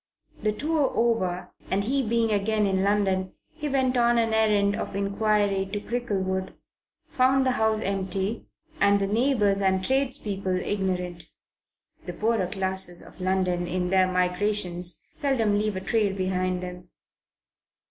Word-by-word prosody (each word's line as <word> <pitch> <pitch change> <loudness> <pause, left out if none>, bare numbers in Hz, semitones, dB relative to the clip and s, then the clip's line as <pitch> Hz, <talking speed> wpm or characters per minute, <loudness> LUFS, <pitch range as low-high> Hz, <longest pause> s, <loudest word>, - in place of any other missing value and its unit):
The 215 - +1
tour 295 +5 0
over, 205 -7 0 0.2
and 195 +1 +1
he 270 +6 +1
being 230 -1 +1
again 210 +1 +1
in 190 -1 +1
London, 195 -2 +1 0.2
he 295 - -4
went 260 -2 +1
on 240 0 +3
an 225 -1 +1
errand 210 -2 +3
of - - -5
inquiry 200 0 +1
to 205 - -2
Cricklewood, 190 -5 -2 0.5
found 265 +1 +2
the 260 - +3
house 220 -2 +1
empty 195 +2 -2 0.3
and 200 0 +4
the 200 - +1
neighbours 210 -2 +2
and 190 -1 +1
tradespeople 210 -8 -1
ignorant. 180 -3 -2 0.8
The - - -5
poorer 220 -4 0
classes 190 -2 -2
of - - -14
London 185 -1 0
in 180 0 -1
their 185 0 +3
migrations 180 -2 -1
seldom 230 -7 +1
leave 210 0 0
a 185 - -3
trail 210 -1 +1
behind 185 -1 -1
them. 180 0 -8
200 Hz, 140 wpm, -26 LUFS, 185-220 Hz, 0.8 s, and